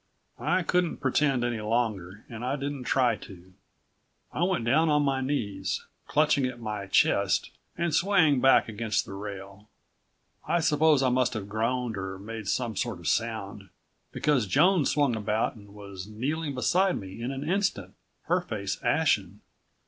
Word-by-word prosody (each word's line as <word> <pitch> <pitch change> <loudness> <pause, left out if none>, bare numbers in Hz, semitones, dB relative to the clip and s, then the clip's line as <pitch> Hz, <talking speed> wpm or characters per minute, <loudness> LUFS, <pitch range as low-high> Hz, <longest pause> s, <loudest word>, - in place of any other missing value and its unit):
I 185 0 +1
couldn't 180 0 0
pretend 135 -1 +1
any 120 -2 -1
longer, 105 -4 -2
and 115 0 -8
I 130 +2 -1
didn't 140 -2 -4
try 125 -3 +2
to. 95 -1 -13 0.8
I - - -4
went 180 -10 0
down 155 +7 +3
on 150 -1 +3
my 135 -2 0
knees, 130 -7 -2 0.2
clutching 145 -3 +2
at 125 -1 -7
my 105 -3 -5
chest - - +2 0.3
and 170 -2 -1
swaying 165 -8 +3
back 135 - +5
against 110 0 -1
the - - -9
rail. 100 +1 -8 0.8
I 175 - +2
suppose 155 -3 +3
I 130 - +3
must 125 -1 +1
have 100 -3 -4
groaned 115 +2 -1
or 95 0 -5
made 110 +1 -7
some 115 0 -1
sort 95 - -2
of 85 -3 -8
sound, 105 -4 -2 0.4
because 140 -8 +1
Joan 170 - +4
swung 145 -5 +2
about 110 0 -1
and 100 -4 -15
was 100 -2 -9
kneeling 140 +7 -3
beside 180 - +2
me 95 +3 -9
in 120 - -2
an 135 +2 -5
instant, 180 - -1 0.3
her 175 +3 +1
face 105 - -4
ashen. 105 - +1
120 Hz, 160 wpm, -27 LUFS, 105-145 Hz, 0.8 s, back